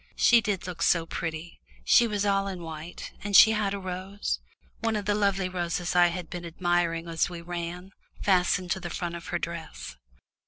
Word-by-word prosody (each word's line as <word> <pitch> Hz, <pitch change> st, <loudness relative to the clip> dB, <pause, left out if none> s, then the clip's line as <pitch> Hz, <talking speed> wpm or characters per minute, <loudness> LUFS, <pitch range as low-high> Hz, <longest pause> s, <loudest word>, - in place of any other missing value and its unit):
She 235 Hz, -1 st, +5 dB
did 205 Hz, -3 st, -2 dB
look 175 Hz, -2 st, -6 dB
so 170 Hz, -1 st, +3 dB
pretty; 165 Hz, 0 st, -5 dB, 0.2 s
she 240 Hz, -, +6 dB
was 210 Hz, -2 st, -1 dB
all 195 Hz, -1 st, +2 dB
in 185 Hz, -3 st, -5 dB
white, 160 Hz, +1 st, -7 dB
and 205 Hz, 0 st, -1 dB
she 220 Hz, -, +10 dB
had 210 Hz, -2 st, 0 dB
a 200 Hz, -, -2 dB
rose 185 Hz, -, -4 dB, 0.4 s
one 225 Hz, -1 st, 0 dB
of 205 Hz, -1 st, -2 dB
the 205 Hz, -, +2 dB
lovely 200 Hz, -2 st, +1 dB
roses 175 Hz, -1 st, -2 dB
I 175 Hz, 0 st, +7 dB
had 175 Hz, 0 st, -4 dB
been 175 Hz, +1 st, -6 dB
admiring 170 Hz, -1 st, 0 dB
as 165 Hz, +2 st, 0 dB
we 175 Hz, -1 st, -7 dB
ran 175 Hz, +2 st, -6 dB, 0.3 s
fastened 180 Hz, -1 st, +2 dB
to 190 Hz, -, 0 dB
the 175 Hz, -2 st, -6 dB
front 170 Hz, 0 st, -4 dB
of 170 Hz, 0 st, -7 dB
her 175 Hz, -, -1 dB
dress. 165 Hz, -, -6 dB
180 Hz, 195 wpm, -27 LUFS, 170-195 Hz, 0.4 s, she